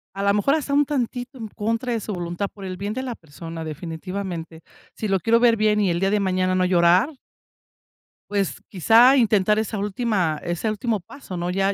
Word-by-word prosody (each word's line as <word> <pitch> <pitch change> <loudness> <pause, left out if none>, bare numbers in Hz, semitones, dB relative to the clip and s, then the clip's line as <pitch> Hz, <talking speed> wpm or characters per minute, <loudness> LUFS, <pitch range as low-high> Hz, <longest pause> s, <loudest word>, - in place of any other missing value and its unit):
A 195 - -3
la 200 0 +3
mejor 275 +9 +2
hasta 285 -2 -2
un 290 0 +4
tantito 255 -1 -3
en 225 -2 -6
contra 230 +4 -2
de 225 - -2
su 210 - -5
voluntad, 175 +2 -3
por 200 -2 -9
el 185 -1 -4
bien 200 +3 -4
de 260 - -3
la 255 -3 -4
persona, 165 0 -9
definitivamente. 165 +1 -6 0.3
Si 215 - -4
lo 195 -1 +1
quiero 230 +4 +3
ver 235 -1 +5
bien 210 -1 +2
y 200 - +2
el 170 +1 -1
día 195 - +2
de 210 0 +2
mañana 185 -1 +1
no 185 0 +2
llorar 180 - +4 1.2
pues, 195 -8 -1
quizá 230 - +6
intentar 210 -2 +3
esa 220 0 -2
última 200 -6 -1
ese 175 +6 -2
último 215 -1 -2
paso, 185 0 -10
¿no? 175 +1 -2
Ya 195 +2 +1
200 Hz, 205 wpm, -23 LUFS, 180-225 Hz, 1.2 s, quizá